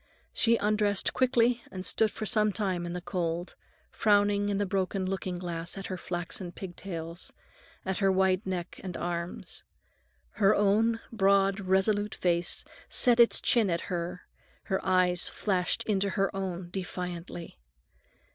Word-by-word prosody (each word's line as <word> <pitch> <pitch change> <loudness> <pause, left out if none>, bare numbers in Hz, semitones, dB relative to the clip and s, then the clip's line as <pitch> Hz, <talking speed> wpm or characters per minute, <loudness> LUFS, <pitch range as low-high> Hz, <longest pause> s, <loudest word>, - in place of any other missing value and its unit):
She 230 0 +4
undressed 210 -1 +1
quickly 245 -2 +3
and 185 0 -5
stood 220 +3 +3
for 215 +2 -5
some 215 0 +3
time 185 -4 -1
in 170 - -4
the 180 - -4
cold, 175 -1 -2 0.4
frowning 205 -1 +3
in 200 - 0
the 205 - +1
broken 190 0 -1
looking 185 -1 -3
glass 175 0 -5
at 195 - -6
her - - -1
flaxen 175 +1 -5
pig 180 -1 -8
tails, 170 -2 -6 0.5
at 190 -1 -1
her 195 -1 +3
white 190 +1 +2
neck 180 -2 -4
and 185 -3 -5
arms. 170 0 -4 0.8
Her 200 +1 +6
own 220 +3 +2
broad, 195 -2 +3
resolute 200 +2 +1
face 175 -1 0 0.2
set 245 -1 +3
its 235 - +6
chin 230 -6 +3
at 170 -1 0
her, 175 +1 -3 0.4
her 190 - -2
eyes 180 -1 +3
flashed 185 -4 0
into 200 -2 0
her 195 0 0
own 185 -2 -4
defiantly. 180 - -6
190 Hz, 145 wpm, -29 LUFS, 180-205 Hz, 0.8 s, Her